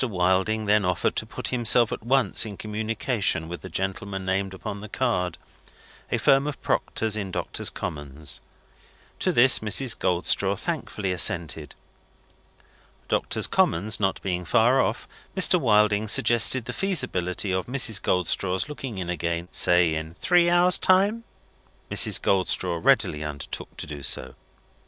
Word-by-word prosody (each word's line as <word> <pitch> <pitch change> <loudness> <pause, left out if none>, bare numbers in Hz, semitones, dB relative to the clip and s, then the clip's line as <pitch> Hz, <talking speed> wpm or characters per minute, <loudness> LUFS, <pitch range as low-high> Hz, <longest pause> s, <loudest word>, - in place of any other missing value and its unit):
Wilding 95 0 0
then 105 0 +2
offered 90 -1 -1
to - - -1
put - - -4
himself 120 -2 +3
at - - -5
once 125 -3 +2
in 105 -3 -5
communication 110 -4 -2
with 85 +1 -7
the 95 - -9
gentlemen 95 0 -4
named 95 +1 -1
upon 100 +1 -7
the 105 - -9
card: 100 -8 -2 0.7
a - - +1
firm 135 +1 +3
of 150 - -5
proctors 110 -1 -1
in 100 -3 -4
Doctors' - - -3
Commons. 75 0 -7 0.8
To - - +1
this, 125 +2 +6
Mrs. 115 +3 +2
Goldstraw 90 -1 0
thankfully 95 -3 -4
assented. 80 -3 0 1.3
Doctors' - - 0
Commons 100 +7 +1
not 95 -2 0
being 90 -2 -2
far 120 +6 +3
off, - - -3 0.3
Mr. - - +4
Wilding 105 0 +2
suggested 120 +1 +4
the 125 - -5
feasibility 115 - -2
of 95 0 -2
Mrs. 120 -6 +1
Goldstraw's 90 +4 0
looking 135 -7 -7
in 90 -2 -4
again, 85 0 -3
say 90 -2 +3
in 80 +1 -5
three 175 - +2
hours' 175 +1 +4
time. 200 +5 +2 0.7
Mrs. - - +4
Goldstraw 90 -2 0
readily 75 0 +2
undertook 75 -2 -7
to - - -5
do 75 -1 -8
so. - - -2
100 Hz, 140 wpm, -24 LUFS, 90-120 Hz, 1.3 s, this